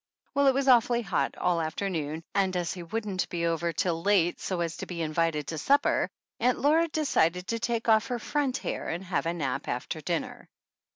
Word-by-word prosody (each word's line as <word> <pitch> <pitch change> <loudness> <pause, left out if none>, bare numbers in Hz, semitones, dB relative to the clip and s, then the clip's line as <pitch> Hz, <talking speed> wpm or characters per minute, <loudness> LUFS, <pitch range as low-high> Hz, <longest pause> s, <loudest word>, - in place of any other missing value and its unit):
Well, 280 0 +3
it 265 - +5
was 275 0 0
awfully 240 -1 +5
hot 195 -4 -1
all 175 -1 +1
the - - 0
afternoon, 160 -2 -3
and, 190 -2 +1
as 175 -1 -1
he 180 - -7
wouldn't 195 +1 -3
be 170 -1 -2
over 170 0 0
till 165 0 -1
late 180 -3 +2
so 185 -3 -2
as 170 -1 -2
to - - -6
be 170 -2 -3
invited 155 -1 0
to 160 - -3
supper, 280 - +2 0.3
Aunt 250 +1 +2
Laura 320 +4 +3
decided 180 - +1
to 230 - -1
take 230 0 -1
off 220 -1 +4
her 245 - -2
front 270 +2 -1
hair - - -4
and 170 +3 -3
have 180 -3 -1
a 165 - 0
nap 140 -6 -2
after - - -3
dinner. - - -3
185 Hz, 210 wpm, -28 LUFS, 165-235 Hz, 0.3 s, it